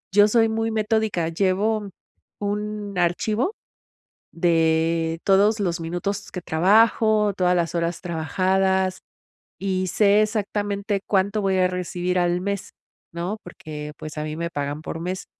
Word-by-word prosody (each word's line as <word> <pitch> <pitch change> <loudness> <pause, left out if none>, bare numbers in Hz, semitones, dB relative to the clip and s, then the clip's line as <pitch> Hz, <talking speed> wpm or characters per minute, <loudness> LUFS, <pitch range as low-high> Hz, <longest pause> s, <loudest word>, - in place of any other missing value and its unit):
Yo 205 0 +7
soy 225 0 +4
muy 225 0 -1
metódica, 215 -5 0
llevo 200 +4 0 0.5
un 210 0 -3
archivo 210 - +1 0.8
de 165 -1 +1
todos 205 +3 +4
los 175 -3 -1
minutos 195 +4 -3
que 180 - -5
trabajo, 210 +4 +3
todas 180 -1 +2
las 170 -1 0
horas 170 0 -1
trabajadas, 185 +3 0 0.6
y 185 -1 -1
sé 205 +3 +4
exactamente 205 -1 -1
cuánto 200 +1 +1
voy 190 -1 +1
a 185 0 +4
recibir 180 0 -2
al 175 0 +1
mes, 200 0 -3 0.4
¿no? 175 +6 -3
Porque, 150 -3 -8
pues, 155 0 -8
a 150 - -2
mí 155 0 -4
me 170 +1 -3
pagan 145 +1 -3
por 165 - -6
mes, 185 +2 -4
190 Hz, 135 wpm, -23 LUFS, 170-205 Hz, 0.8 s, Yo